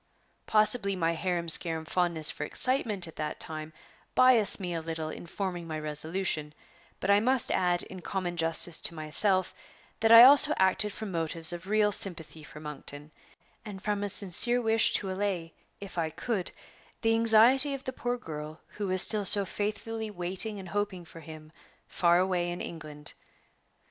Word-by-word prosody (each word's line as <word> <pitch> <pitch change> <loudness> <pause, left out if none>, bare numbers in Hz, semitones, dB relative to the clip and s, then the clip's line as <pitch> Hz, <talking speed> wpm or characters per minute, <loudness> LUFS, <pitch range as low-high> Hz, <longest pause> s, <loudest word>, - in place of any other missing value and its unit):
Possibly 215 -2 +3
my 165 -2 -1
harum 175 0 -3
scarum 160 0 +1
fondness 170 -3 0
for - - -7
excitement 215 - 0
at 165 - -14
that 150 -1 -5
time 155 0 -1 0.4
biased 255 -5 +5
me 180 -3 -5
a 165 - -4
little 160 -1 -5
in 170 - -10
forming 175 -2 -5
my 155 -1 -5
resolution; 155 0 -3 0.4
but 195 - 0
I 200 - +5
must 250 +2 +1
add, 175 -1 +2
in 185 -1 -11
common 180 -1 -4
justice 165 0 +2
to 165 - +1
myself, 185 +5 +1 0.5
that 225 0 +2
I 230 +1 +10
also 290 +3 +6
acted 190 +2 +2
from 215 -1 -7
motives 165 0 -2
of 175 +1 -9
real 210 0 +1
sympathy 160 -6 -1
for 150 - -12
Monkton, 150 0 -7 0.5
and 205 -3 -9
from 205 0 -3
a 205 - -2
sincere 205 +5 +1
wish 225 -1 +2
to 195 -2 -2
allay, 185 -4 -4 0.3
if 195 -3 -8
I 160 -1 -1
could, 195 +3 -4 0.5
the 225 0 +2
anxiety 230 +5 +4
of 270 - -10
the 260 - -6
poor 245 0 -4
girl 155 -6 -9
who 205 -1 -6
was 185 0 +3
still 210 -2 +1
so 200 +1 +5
faithfully 215 +3 -5
waiting 190 +3 +2
and 185 -2 -10
hoping 200 -3 -4
for 165 - -13
him 155 -1 -13 0.4
far 170 -1 +1
away 180 -1 -1
in 175 - -6
England. 150 -3 -8
185 Hz, 170 wpm, -28 LUFS, 165-210 Hz, 0.5 s, I